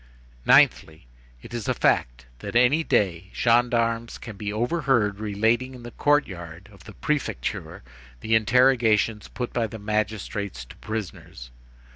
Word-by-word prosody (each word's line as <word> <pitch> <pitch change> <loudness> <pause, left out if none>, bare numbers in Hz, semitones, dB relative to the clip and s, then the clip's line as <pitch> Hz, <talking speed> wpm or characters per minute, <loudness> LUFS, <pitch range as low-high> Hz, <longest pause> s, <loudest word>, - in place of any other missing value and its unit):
"Ninthly: 80 -5 +4 0.4
it - - -11
is 120 -4 -4
a - - +1
fact - - +1
that - - -7
any 125 +7 +4
day 95 - 0
gendarmes 115 -1 +1
can 110 - -9
be 105 +1 -4
overheard 120 -3 0
relating 110 +5 0
in 125 - -12
the 120 - -8
court 145 +3 +2
yard 85 0 -10
of 100 - -18
the 105 - -11
prefecture 140 - -3 0.4
the 110 - -1
interrogations 115 -2 +3
put 125 -1 -5
by 115 -2 0
the 110 - -8
magistrates 100 - -3
to - - -14
prisoners. 95 - -7
110 Hz, 140 wpm, -24 LUFS, 100-120 Hz, 0.4 s, Ninthly